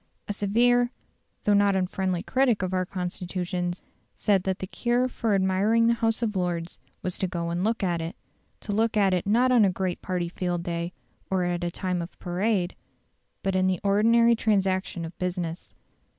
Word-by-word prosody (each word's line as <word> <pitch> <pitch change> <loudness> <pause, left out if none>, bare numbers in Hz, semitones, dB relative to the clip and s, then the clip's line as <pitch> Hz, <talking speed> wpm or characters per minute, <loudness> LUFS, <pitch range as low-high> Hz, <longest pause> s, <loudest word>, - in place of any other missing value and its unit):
A 205 - -2
severe 240 +4 +3 0.5
though 210 - +3
not 200 -1 +4
unfriendly 185 -1 -1
critic 255 -7 +2
of 185 0 -2
our 185 -1 0
institutions 180 0 -3 0.3
said 200 -3 +2
that 190 -1 0
"the - - -4
cure 240 +5 0
for 225 -4 0
admiring 195 +4 +3
the 235 - +4
House 225 0 0
of 215 -3 -1
Lords 175 -2 -2 0.2
was 185 - -3
to 190 - +1
go 170 -1 -3
and 175 +2 -1
look 225 0 0
at 175 -3 0
it" 165 +1 -5 0.5
to 210 - -5
look 220 +1 +1
at 195 -2 +4
it 180 +2 -1
not 245 +5 +4
on 240 -3 +6
a 195 - +5
great 185 0 -2
party 180 -2 -2
field 175 0 -2
day, 170 0 -3 0.4
or 190 -1 +1
at 175 0 -1
a 175 - 0
time 180 0 -2
of 170 - -8
parade, 185 +1 -1 0.7
but 195 -1 0
in 185 0 +3
the 185 -1 +1
ordinary 230 +4 +4
transaction 190 -5 0
of 165 - -9
business. 180 -2 -4
190 Hz, 185 wpm, -26 LUFS, 180-215 Hz, 0.7 s, on